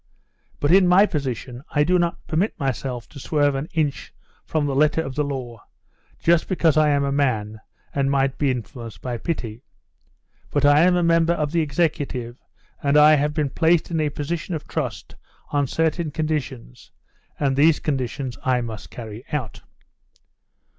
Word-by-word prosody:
But 145 - +1
in 185 0 +6
my 185 +3 +6
position 130 - -4
I 145 - +2
do 180 +4 +2
not 170 -1 -2
permit 175 +7 -1
myself 130 -2 -3
to - - -11
swerve 145 +1 +1
an 135 +3 -3
inch 155 -4 -2 0.4
from 155 -2 0
the 140 - -1
letter 150 +3 +2
of 135 - -6
the 150 +2 0
law, 125 -6 -5 0.6
just 170 0 +2
because 170 -5 +2
I 155 -1 +4
am 140 -1 +2
a 140 - 0
man, 110 -7 -1 0.3
and 135 -1 +1
might 135 -1 +1
be 145 - +2
influenced 115 -4 -5
by 120 -2 -3
pity. 115 -4 -4 0.9
But 145 -1 +1
I 145 +1 +6
am 180 0 +4
a 175 - +2
member 165 0 +3
of 150 -3 -2
the 170 0 +2
executive, 140 -6 -1 0.5
and 140 +1 +3
I 150 +1 +8
have 150 0 +1
been 150 -3 0
placed 165 +2 +2
in 165 - 0
a 155 -1 +1
position 160 +4 -4
of 155 - -7
trust - - -4 0.4
on 145 -1 +1
certain 165 +3 0
conditions, 145 - -4 0.5
and 140 -2 +1
these 150 +3 +4
conditions 130 -3 -3
I 130 -1 +2
must 115 -2 -7
carry 110 -1 -8
out. 130 -8 -4
145 Hz, 170 wpm, -23 LUFS, 130-160 Hz, 0.9 s, I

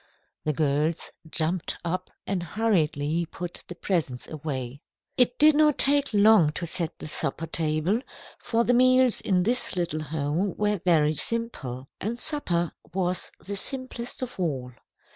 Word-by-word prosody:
The 155 - +1
girls 150 +2 0 0.2
jumped 160 +3 0
up 185 +2 -2 0.2
and 195 -2 -1
hurriedly 170 -5 0
put 175 +1 -7
the 175 - -8
presents 155 -12 -2
away. 140 -4 -5 0.3
It 250 0 +2
did 305 +1 +7
not 300 -1 +4
take 285 0 +3
long 205 -6 +6
to 170 - -2
set 165 -1 -2
the - - -7
supper 155 0 -1
table, 160 +6 0 0.4
for 230 -1 +1
the 245 - +2
meals 255 0 +4
in 185 -3 +2
this 240 +2 +1
little 170 -3 -2
home 155 +5 -2
were 210 -3 0
very 155 -4 +3
simple, 145 - -3
and 225 +4 -3
supper 175 - +1 0.2
was 180 0 0
the 200 - -3
simplest 255 +2 -2
of 250 -5 -7
all. 135 -8 -2
175 Hz, 145 wpm, -26 LUFS, 155-230 Hz, 0.4 s, did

